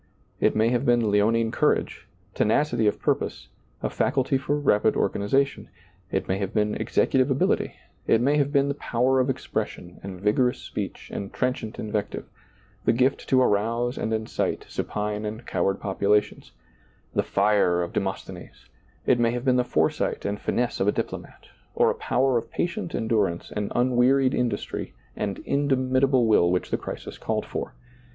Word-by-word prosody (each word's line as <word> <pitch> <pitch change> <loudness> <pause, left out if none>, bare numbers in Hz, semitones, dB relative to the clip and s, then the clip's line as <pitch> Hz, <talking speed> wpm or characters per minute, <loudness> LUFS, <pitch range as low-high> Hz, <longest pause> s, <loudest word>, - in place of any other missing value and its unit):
It - - +2
may 110 +1 +3
have 120 0 +1
been 120 -3 +3
leonine 110 +2 +2
courage, - - 0 0.3
tenacity 115 0 +2
of 105 - +1
purpose, - - -2 0.3
a - - 0
faculty 135 0 +1
for 140 +2 0
rapid 120 -7 +3
organization; 135 +7 0 0.4
it 95 - -2
may 95 +1 0
have 100 +2 -3
been 105 -1 +2
executive 130 0 +1
ability; 135 0 +1 0.3
it 115 - +4
may 140 +5 +2
have 145 -1 +1
been 140 -1 +3
the 140 - 0
power 130 -1 +1
of 130 +1 +1
expression 90 -8 -4
and 95 -2 -7
vigorous 115 +5 +2
speech - - -6
and 100 - -5
trenchant 125 -4 -2
invective, 105 -1 -3 0.6
the - - +3
gift 130 +3 +1
to 130 -1 +5
arouse 115 +4 +1
and 110 - -3
incite 110 0 -2
supine 105 0 -3
and 110 +3 -5
coward 95 0 0
populations 100 +1 0 0.3
— - - -35
the - - +2
fire 100 -3 +2
of 85 - -6
De - - +2
mosthenes; 95 -2 -7 0.4
it 120 - +3
may 115 -1 +3
have 120 +2 -3
been 130 -1 +4
the 125 - +3
foresight - - 0
and 100 +1 -2
finesse 120 0 -1
of 95 - +1
a - - +5
diplomat - - -5 0.3
or - - +4
a - - -1
power 130 -2 +1
of - - -11
patient 175 +1 -3
endu 110 -2 +1
rance 85 -3 -4
and 105 -1 -2
unwearied 130 +2 +3
industry 125 -1 -2 0.2
and 100 -2 -3
indomitable 130 -2 +2
will 105 -6 +4
which 90 - -1
the - - +2
crisis - - -7
called - - -2
for. - - -5
115 Hz, 170 wpm, -25 LUFS, 105-130 Hz, 0.6 s, to